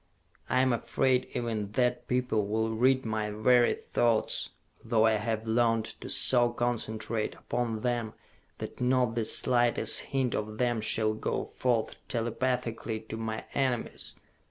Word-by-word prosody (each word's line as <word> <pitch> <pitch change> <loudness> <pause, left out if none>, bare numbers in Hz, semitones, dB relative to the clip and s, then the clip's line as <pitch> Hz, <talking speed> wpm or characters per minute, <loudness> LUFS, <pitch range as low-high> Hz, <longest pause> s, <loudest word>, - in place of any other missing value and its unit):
I 130 - +3
am 130 -1 +3
afraid 130 +2 +1
even 110 -4 -3
that 125 0 0
people 125 -5 0
will 110 +2 0
read 130 +3 +2
my 110 -1 -1
very 120 +3 +3
thoughts, 115 -2 0 0.3
though 110 -1 +3
I 110 - +5
have 110 +1 -1
learned 115 0 +2 0.2
to - - -7
so 120 -2 +4
concentrate 115 -2 -2
upon 115 -3 -3
them 120 -3 -1 0.4
that - - -7
not 125 -2 +2
the 115 -1 -1
slightest 120 -2 +3
hint 130 -3 0
of 110 0 -3
them 120 -2 0
shall 110 0 +1
go 110 - -2
forth 120 -3 -1
telepathically 120 -1 -2
to 110 0 -7
my 110 -1 -4
enemies! 130 -4 -2
115 Hz, 140 wpm, -29 LUFS, 110-125 Hz, 0.4 s, I